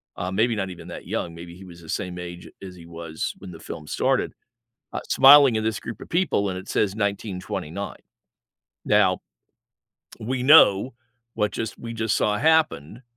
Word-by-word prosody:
uh, 90 - -4
maybe 110 +5 +1
not 95 -2 -3
even 90 - -10
that - - -9
young, 85 - -3
maybe 85 +1 -10
he 95 - -12
was 85 -2 -13
the 80 - -14
same 90 -1 -4
age 85 0 -8
as 95 -2 -9
he 85 -2 -13
was 85 -1 -5
when 95 - -10
the 80 - -11
film 75 -2 -9
started- - - 0 0.6
ah, - - -3
smiling 135 -3 +7
in 110 - -2
this 110 -2 -1
group 115 - -8
of - - -10
people, 170 - 0
and 90 - -4
it 95 - -9
says 100 -2 0
1929. 100 -3 -4 0.8
Now - - +3 1.0
we 125 +3 -3
know 130 -5 +6 0.4
what 105 0 0
just 115 -1 -5
we 115 - -7
just 110 -1 0
saw 105 -1 +1
happened 150 - +1
100 Hz, 180 wpm, -24 LUFS, 90-115 Hz, 1.0 s, smiling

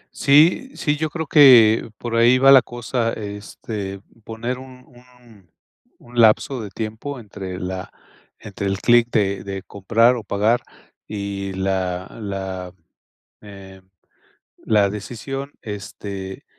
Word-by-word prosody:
Sí 155 - +4
sí, 150 -2 0
yo 155 +1 -2
creo 160 0 -4
que 120 -8 +6
por 120 -1 -4
ahí 120 +2 +5
va 135 +1 +6
la 135 -2 +9
cosa, 120 -1 -3
este, 100 -1 -7 0.2
poner 115 +3 -5
un 130 -1 -13
un 120 -7 -21 0.5
un 120 0 -7
lapso 115 +3 +3
de 105 - -7
tiempo 110 +7 -6
entre 95 -4 -8
la 95 +1 -5 0.5
entre 100 0 -6
el 95 0 -1
clic 120 0 +4
de 100 -4 0
de 95 -1 -6
comprar 115 +6 +2
o 115 - -6
pagar 105 +5 +1 0.5
y 100 -2 -5
la 95 -1 -2
la, 95 -3 -5 0.7
eh, 95 -2 -13 0.8
la 105 -2 +2
decisión, 130 +7 -6
este, 100 -2 -7
110 Hz, 125 wpm, -21 LUFS, 100-125 Hz, 0.8 s, la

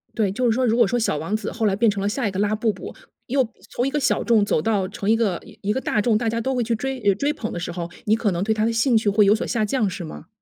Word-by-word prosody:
对， 210 -4 +1
就 250 +6 -1
是 235 - +4
说， 255 +3 +1
如 225 -1 +2
果 235 -4 +5
说 245 - 0
小 225 -9 0
王 165 +8 -2
子 220 - -3
后 225 -1 -2
来 200 -2 +2
变 225 +2 +3
成 200 -1 -2
了 200 - 0
下 235 +2 -1
一 - - -2
个 190 - -4
拉 210 +1 +1
布 220 +1 +1
布， - - -9 0.3
又 265 -1 +1 0.2
从 245 +3 -1
一 - - -2
个 295 - 0
小 275 - +1
众 225 -3 +3
走 155 - +1
到 200 -2 0
成 205 0 -4
一 225 - +5
个 215 -6 0 0.2
一 205 +1 0
个 260 - -2
大 215 - 0
众， 220 0 +2
大 225 0 0
家 230 +1 -1
都 265 +3 -1
会 245 - +1
去 230 +1 0
追 265 +3 -3
呃 200 -2 +3
追 285 +8 0
捧 220 -7 -5
的 175 - -4
时 175 - -4
候， 170 -1 -5 0.2
你 215 - +4
可 225 -3 0
能 175 +1 -1
对 220 +2 +1
他 215 0 0
的 230 - +1
兴 230 +1 +3
趣 220 -1 +1
会 205 +1 +4
有 205 +2 +5
所 - - -3
下 235 -3 0
降 215 -1 0
是 180 - -6
吗？ 75 -1 -9
220 Hz, 365 characters per minute, -22 LUFS, 200-235 Hz, 0.3 s, 果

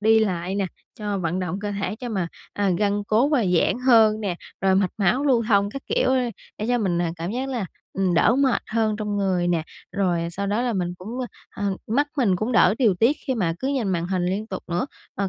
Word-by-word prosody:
đi 220 +1 +5
lại 185 -3 0
nè, 200 -2 0 0.3
cho 205 -2 -3
vận 175 +1 -1
động 180 +1 -2
cơ 205 -1 -3
thể 200 +1 -3
cho 245 0 -6
mà, 190 -6 -1 0.2
à, 200 -2 +1
gân 205 0 +1
cốt, 240 +9 +2
à, 255 -6 +3
giãn 235 - +2
hơn 220 -3 +6
nè, 190 -4 -2 0.2
rồi 190 0 +3
mạch 190 -1 +2
máu 205 +8 +2
lưu 250 -5 +3
thông, 200 -1 +3
các 275 - -7
kiểu, - - +1
ơ, 260 - +3 0.4
để 215 - -2
cho 245 0 +2
mình, 180 -5 0
ờ, 175 - +1
cảm 170 +3 -4
giác 260 +3 -2
là, 240 -7 -2 0.3
ừm, 190 -2 +1
đỡ 230 +8 +4
mệt 265 -3 +2
hơn 220 -1 0
trong 210 -1 -2
người 185 -3 +1
nè, 170 -2 +1 0.3
rồi 175 -4 0
sau 200 +3 -3
đó 210 +4 0
là 245 -2 0
mình 180 -3 -2
cũng, 185 +4 -9
ơ, 250 - -2 0.4
ờ, 195 -1 0
mắt 280 +7 +2
mình 205 -9 +3
cũng 220 +6 -2
đỡ 220 - +5
điều 220 -8 +4
tiết 235 +11 +3
khi 260 - +1
mà 180 -7 0
cứ 265 - -2
nhìn 260 -8 0
màn 170 -2 0
hình 185 -1 -1
liên 200 +4 -1
tục 190 -4 -6
nữa. 175 +10 -1 0.3
Ờ, 195 0 -1
205 Hz, 245 wpm, -24 LUFS, 185-230 Hz, 0.4 s, hơn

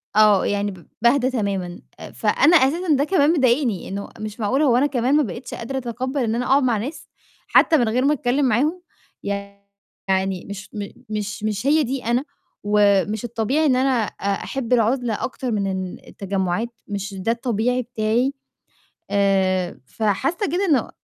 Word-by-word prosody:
آه، 210 -2 +5
يعني 205 0 0
ب 180 -2 -14
باهدا 250 +2 +3
تمامًا. 195 -7 -3 0.2
آآ - - -9
فأنا 330 +4 +4
أساسًا 315 +5 +2
ده 280 - +2
كمان 310 -2 +3
مضايقني 255 - +1
إنه 200 +1 -5
مش 215 +1 -6
معقول 250 +7 +1
هو 255 -6 +4
أنا 270 - +3
كمان 260 0 +1
ما 300 - +4
بقيتش 235 +2 -7
قادرة 265 +4 -5
أتقبَّل 260 +2 -3
إن 225 -1 0
أنا 245 - -1
أقعُد 275 +2 +3
مع 240 -3 +2
ناس، 270 +10 -6 0.4
حتّى 320 - +5
من 240 -5 +2
غير 250 +4 +1
ما 295 - +4
أتكلِّم 270 0 0
معاهم؟ 290 +10 +1 0.4
يعني 200 -2 -4
مش 200 0 -7
م 205 -1 -4 0.2
مش 210 -1 -4
مش 215 +3 -2
هي 305 +2 +4
دي 265 -1 -4
أنا 240 +4 +1 0.4
ومش 205 0 +2
الطبيعي 240 +7 0
إن 270 -4 +4
أنا 265 +1 +2
آآ - - -11 0.2
أحِب 255 -3 -2
العُزلة 240 -1 +1
أكتر 255 -1 -3
من 205 -3 0
إن 190 -1 -4
التجمُّعات، 195 +3 -2 0.2
مش 200 -1 -4
ده 195 +4 -1
الطبيعي 240 +1 0
بتاعي. 240 +2 0 0.8
آآ 190 -2 +1
فحاسّة 215 - -1
كده 370 +4 +1
إنه 285 - +2
230 Hz, 170 wpm, -22 LUFS, 200-265 Hz, 0.8 s, آه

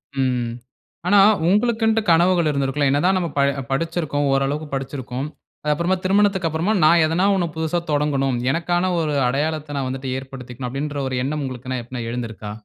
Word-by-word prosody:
ம், - - -3 0.2
ம். 120 -1 -3 0.6
ஆனா, 205 +2 +6 0.3
உங்களுக்கின்ட்டு 225 +2 +2
கனவுகள் 170 0 +4
இருந்திருக்கும் 140 0 -1
இல்ல. 135 - +3
என்னதான் 180 +7 +2
நம்ம 175 -2 -1
ப - - +4 0.3
படிச்சிருக்கோம். 145 -1 -1
ஓரளவுக்கு 140 +3 0
படிச்சிருக்கோம். 135 0 -4 0.4
அது 150 - +1
அப்புறமா 170 +5 0
திருமணத்துக்கு 195 -1 +2
அப்பறமா 165 +7 0
நான் 165 +1 +6
எதனா 165 +4 +1
ஒண்ணு 175 -3 0
புதிதா 160 +2 -1
தொடங்கணும். 140 -3 +1
எனக்கான 175 +4 0
ஒரு 155 -2 -1
அடையாளத்த 145 +2 -2
நான் 135 -2 -1
வந்துவிட்டு 130 0 -4
ஏற்படுத்திக்கணும் 130 -1 -8
அப்பிடின்ற 145 +2 -3
ஒரு 130 - -3
எண்ணம் 150 +2 -2
உங்களுக்கு 130 0 -4
எப்பன்னா 125 +1 -6
எழுந்திருக்கா? 110 -3 -5
150 Hz, 160 wpm, -21 LUFS, 135-175 Hz, 0.6 s, ஆனா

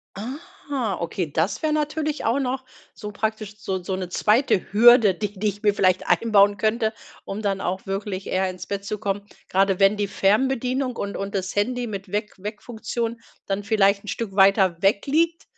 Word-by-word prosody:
Ah, 260 - -5
okay, 170 -1 -3
das 165 +7 0
wäre 310 - 0
natürlich 305 0 -1
auch 235 +5 +2
noch 260 0 -2 0.3
so 210 -2 -7
praktisch, 215 0 -3
so 190 -3 -3
so 190 +1 -2
’ne 185 -1 -5
2. 210 +2 +2
Hürde, 230 -1 +7
die 205 +1 -5
die 210 +3 0
ich 205 0 -3
mir 210 -2 +3
vielleicht 185 -2 +2
einbauen 205 -3 +4
könnte, 220 +2 0 0.3
um 200 +2 -5
dann 195 -1 -1
auch 185 +1 -3
wirklich 195 0 -4
eher 190 0 0
ins 185 0 -7
Bett 200 -1 -4
zu 210 - -3
kommen. 200 -1 -2 0.3
Grade 195 0 +2
wenn 195 +1 +4
die 205 -1 0
Fernbedienung 255 +5 +1
und 200 -2 -4
und 195 +1 -4
das 190 -1 -3
Handy 245 +4 0
mit 200 -4 -7
Weck 210 +1 -2
Weckfunktion 225 +3 -5 0.2
dann 195 +1 -2
vielleicht 200 -1 +2
'n - - -14
Stück 205 -2 -4
weiter 195 -3 +4
weg 200 +1 +2
liegt, 330 +4 +1
205 Hz, 185 wpm, -23 LUFS, 195-235 Hz, 0.3 s, Hürde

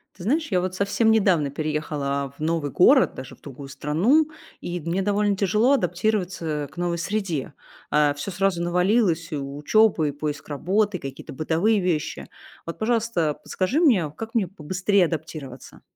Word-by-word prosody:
Ты 180 - -11
знаешь, 300 - +1
я 180 - +2
вот 185 0 -3
совсем 200 +4 +2
недавно 185 -10 +3
переехала 145 -2 -2
в - - -14
новый 155 -2 -1
город, 260 +9 +5
даже 130 0 -9
в - - -33
другую 135 0 -10
страну, 195 - +2 0.3
и 175 0 -4
мне 170 +5 -1
довольно 205 0 +1
тяжело 215 +7 +3
адаптироваться 180 - -1
к - - -20
новой 175 -1 -1
среде. 170 -6 -3 0.4
А, 150 -1 +3
всё 145 +7 -5
сразу 190 -2 0
навалилось: 180 -1 +1
и 150 - -2
учёба, 150 +6 +2
и - - -1
поиск 145 0 -5
работы, 190 +7 0
какие-то 135 -5 -8
бытовые 165 +9 +1
вещи. 175 -5 -2 0.4
Вот, 165 - -7
пожалуйста, 220 -9 0
подскажи 195 +11 -1
мне, 210 - +3
как 225 0 -6
мне 215 -5 +1
побыстрее 185 +3 +1
адаптироваться? 155 -5 -7
175 Hz, 160 wpm, -24 LUFS, 150-205 Hz, 0.4 s, город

